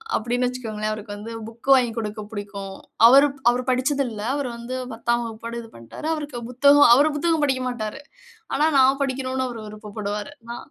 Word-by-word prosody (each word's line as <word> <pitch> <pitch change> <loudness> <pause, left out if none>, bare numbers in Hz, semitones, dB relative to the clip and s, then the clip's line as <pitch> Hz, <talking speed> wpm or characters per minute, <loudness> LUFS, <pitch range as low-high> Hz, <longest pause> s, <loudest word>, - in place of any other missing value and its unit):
அப்டின்னு 245 +2 0
வச்சுக்கோங்களேன். 220 -4 -4
அவருக்கு 210 -1 -6
வந்து 215 +3 -8 0.2
புக் 230 +4 -9
வாங்கி 245 -3 +2
குடுக்க 215 -1 -4
புடிக்கும். 200 -2 -6 0.3
அவரு 275 +4 +7 0.2
அவர் 250 +1 -2
படிச்சதில்ல. 255 -3 0
அவர் 285 -2 -2
வந்து 240 +2 -5 0.2
10ஆம் 235 +1 0
வகுப்போட 230 +1 -7
இது 225 - -12
பண்ணிட்டாரு. 115 - -8
அவருக்கு 290 -6 -6
புத்தகம், 285 +3 +6
அவரு 290 +3 +3
புத்தகம் 325 0 +1
படிக்க 260 -2 0
மாட்டாரு. 240 +2 -5 0.5
ஆனானு 300 +2 +2
நான் 270 +2 +4
படிக்கணும 260 -1 -2
அவர் 230 -2 -7
விருப்பப்படுவாரு. 210 +2 -6 0.2
நா, 240 - -5
240 Hz, 165 wpm, -23 LUFS, 215-270 Hz, 0.5 s, அவரு